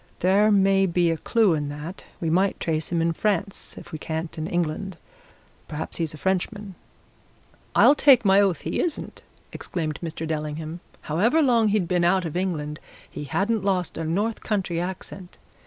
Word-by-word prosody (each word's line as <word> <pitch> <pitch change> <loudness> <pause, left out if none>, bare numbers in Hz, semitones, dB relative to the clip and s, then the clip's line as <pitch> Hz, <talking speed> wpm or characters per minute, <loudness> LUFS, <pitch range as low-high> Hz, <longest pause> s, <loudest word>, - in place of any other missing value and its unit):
There 195 +4 +4
may 195 -1 +4
be 170 -1 +2
a 165 - -1
clue 220 +2 +2
in 145 -2 -2
that 150 +6 -7 0.2
we 165 -2 -1
might 190 +4 +2
trace 160 -1 -2
him 170 -1 +1
in 165 0 +1
France 195 +1 -2
if - - -11
we 155 - -6
can't 160 +1 -4
in 155 0 -4
England. 175 +2 -2 0.7
Perhaps 155 0 -5
he 170 - -1
is 155 -1 -3
a - - -11
Frenchman." 190 +3 -2 1.0
"I'll - - +7
take 270 -5 +5
my 195 +1 +6
oath 195 -4 +1
he - - -3
isn't!" 335 -4 -3 0.3
exclaimed 155 -4 -4
Mr. 165 -1 -4
Dellingham. 155 +1 -4 0.2
"However 225 - +2
long 235 -5 +4
he'd 205 -4 +1
been 175 0 +1
out 180 +1 +3
of 160 - -5
England 155 -5 -2 0.3
he 145 - -6
hadn't 205 +9 0
lost 185 -3 0
a 165 - -4
North 205 +8 -1
Country 185 -5 -1
accent! 185 0 -7
180 Hz, 175 wpm, -24 LUFS, 160-200 Hz, 1.0 s, I'll